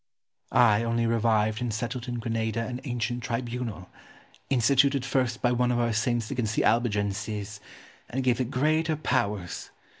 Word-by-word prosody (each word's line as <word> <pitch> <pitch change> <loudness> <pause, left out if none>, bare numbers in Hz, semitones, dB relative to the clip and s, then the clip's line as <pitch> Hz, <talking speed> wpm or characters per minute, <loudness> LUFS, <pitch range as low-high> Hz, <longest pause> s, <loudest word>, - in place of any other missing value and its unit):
Ximenes. - - +2
I 115 -2 +5
only 115 0 0
revived 110 -1 +2
and 120 -2 -1
settled 120 +3 -4
in 120 - -3
Granada 115 -1 -1
an 125 +1 -5
ancient 120 -1 -2
tribunal, 115 -5 -4 0.6
instituted 135 +1 +3
first 125 -3 0
by 120 - +4
one 125 0 +2
of 120 - +1
our 120 -1 +1
saints 115 0 0
against 110 -3 -1
the - - +2
Albigenses, 105 -2 0 0.5
and 130 +2 -2
gave 125 -1 +2
it 125 - -2
greater 155 +4 +1
powers. 100 - -2
120 Hz, 155 wpm, -27 LUFS, 110-125 Hz, 0.6 s, I